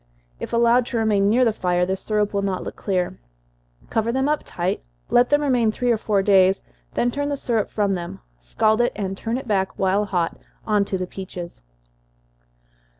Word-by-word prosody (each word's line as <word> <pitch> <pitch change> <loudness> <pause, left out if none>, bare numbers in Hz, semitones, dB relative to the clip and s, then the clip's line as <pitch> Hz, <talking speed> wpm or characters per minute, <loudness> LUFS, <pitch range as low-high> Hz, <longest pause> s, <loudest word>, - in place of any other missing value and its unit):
If - - -6
allowed 235 +1 +3
to 240 - -2
remain 210 -3 +2
near 250 +4 +4
the 225 - +2
fire, 180 -2 +1
the 190 +1 -1
syrup 210 +1 -1
will 200 - +1
not 195 -2 -2
look - - -6
clear. 185 -2 -2 0.7
Cover 225 +1 +1
them 265 +2 0
up 300 0 +1
tight 180 +2 -2 0.3
let 245 +1 +5
them 290 0 +3
remain 245 -6 +2
three 245 +2 0
or 230 - +2
four 205 -2 0
days, 190 -1 +4 0.3
then 245 - +1
turn 285 +3 -2
the 285 - -1
syrup 230 -5 -1
from 205 -2 0
them, 175 -2 -5 0.2
scald 215 - +1
it, 240 - +1
and 195 -2 -3
turn 225 +4 -3
it 265 -1 -7
back, 190 -3 0
while 195 +2 +2
hot, 175 -4 -1 0.3
on 210 -2 +2
to 195 - -2
the 185 - -2
peaches. 180 - -8
210 Hz, 195 wpm, -22 LUFS, 190-235 Hz, 0.7 s, let